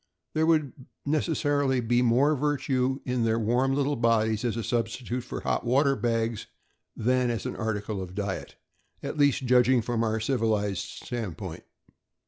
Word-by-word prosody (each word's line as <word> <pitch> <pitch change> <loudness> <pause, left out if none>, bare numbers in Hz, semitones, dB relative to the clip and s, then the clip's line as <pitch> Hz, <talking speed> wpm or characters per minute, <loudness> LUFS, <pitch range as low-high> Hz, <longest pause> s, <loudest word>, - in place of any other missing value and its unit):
There 160 +1 +2
would 155 -5 +2 0.3
necessarily 145 -3 +1
be 120 +1 +2
more 130 +5 +3
virtue 135 -2 0
in 125 -2 0
their 115 0 +2
warm 125 +4 +1
little 145 +1 +1
bodies 115 -2 +2
as 120 -2 -1
a 115 - -2
substitute 120 +1 -2
for - - -6
the - - -19
hot - - 0
water 135 +3 +3
bags 115 -3 -1 0.5
than 125 +2 +1
as 115 -1 -2
an - - -3
article 105 -2 -3
of 90 0 -8
diet, 100 -1 -4 0.5
at - - -4
least 140 -2 +3
judging 125 -1 +4
from 115 0 -1
our 110 0 0
civilized 110 -5 0
stand 110 -9 -5
point. 95 -6 -7
120 Hz, 160 wpm, -27 LUFS, 110-135 Hz, 0.5 s, judging